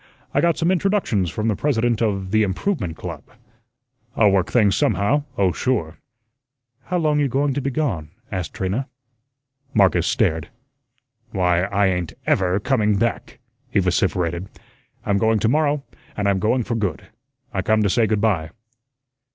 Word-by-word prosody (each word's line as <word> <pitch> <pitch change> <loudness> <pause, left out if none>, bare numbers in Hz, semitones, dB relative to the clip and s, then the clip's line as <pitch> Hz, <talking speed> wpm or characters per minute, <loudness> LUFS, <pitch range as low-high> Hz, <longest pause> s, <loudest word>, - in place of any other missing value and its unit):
I - - +3
got 170 -1 +2
some 170 +2 +2
introductions 185 - +1
from 110 +5 -2
the 110 - +1
President 120 -3 0
of 95 -4 -1
the 110 - +3
Improvement 95 - -1
Club. - - -6 0.9
I'll 105 -3 +4
work 95 +1 +1
things 105 -5 +3
somehow, 105 +9 +1
oh, 95 -4 +3
sure." 85 -9 -2 0.9
"How 180 - -1
long 155 -3 +2
you 145 - +2
going 140 +2 0
to 140 - -2
be 135 - -1
gone?" 115 - -2 0.2
asked 90 -6 -4
Trina. 100 +9 -2 0.9
Marcus 90 -4 +4
stared. 95 - +1 0.9
"Why, 90 -2 +2
I 100 +1 +1
ain't 90 -3 -1
EVER 95 +1 +2
coming 105 -5 +2
back," 115 +3 -2 0.3
he 105 - +2
vociferated. 90 -1 0 0.6
"I'm 100 -1 +1
going 110 +1 +3
to 105 - +1
morrow, 145 +2 +1 0.3
and 100 -1 0
I'm 100 -1 +2
going 115 +5 +1
for 115 - -3
good. 105 -5 -2 0.5
I - - 0
come 110 -1 +2
to - - +2
say 115 +3 +2
good 105 -2 0
by." 90 -8 +1
105 Hz, 160 wpm, -22 LUFS, 95-130 Hz, 0.9 s, I'll